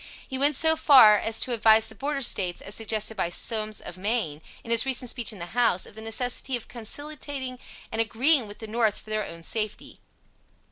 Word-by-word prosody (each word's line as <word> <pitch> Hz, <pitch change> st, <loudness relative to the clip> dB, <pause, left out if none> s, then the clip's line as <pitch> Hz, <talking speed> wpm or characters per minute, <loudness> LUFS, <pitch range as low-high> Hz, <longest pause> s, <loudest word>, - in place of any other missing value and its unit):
He 265 Hz, -, -5 dB
went 290 Hz, +1 st, +2 dB
so 320 Hz, +3 st, +3 dB
far 260 Hz, -9 st, +7 dB
as 225 Hz, 0 st, -2 dB
to 250 Hz, -, -1 dB
advise 220 Hz, -1 st, +5 dB
the 220 Hz, -, -11 dB
Border 275 Hz, +5 st, -3 dB
States, 180 Hz, -6 st, 0 dB
as 195 Hz, -, -8 dB
suggested 220 Hz, 0 st, -2 dB
by 185 Hz, -4 st, -1 dB
Somes, 215 Hz, +3 st, -1 dB
of 180 Hz, -, -9 dB
Maine, 190 Hz, -8 st, -2 dB, 0.2 s
in 230 Hz, -, -7 dB
his 230 Hz, -, +5 dB
recent 255 Hz, -2 st, -1 dB
speech 240 Hz, -3 st, -2 dB
in 210 Hz, -, -11 dB
the 170 Hz, -1 st, -9 dB
House, 230 Hz, -6 st, +2 dB
of -, -, -13 dB
the 220 Hz, -, -10 dB
necessity 245 Hz, +3 st, 0 dB
of 240 Hz, -, -6 dB
conciliating 260 Hz, +1 st, -5 dB, 0.3 s
and 225 Hz, -, 0 dB
agreeing 245 Hz, +3 st, +3 dB
with 205 Hz, -, -11 dB
the 220 Hz, -, -8 dB
North 220 Hz, -1 st, 0 dB
for 215 Hz, -, -13 dB
their 215 Hz, -1 st, -2 dB
own 165 Hz, 0 st, -10 dB
safety. 215 Hz, +2 st, -4 dB
225 Hz, 205 wpm, -25 LUFS, 215-255 Hz, 0.3 s, far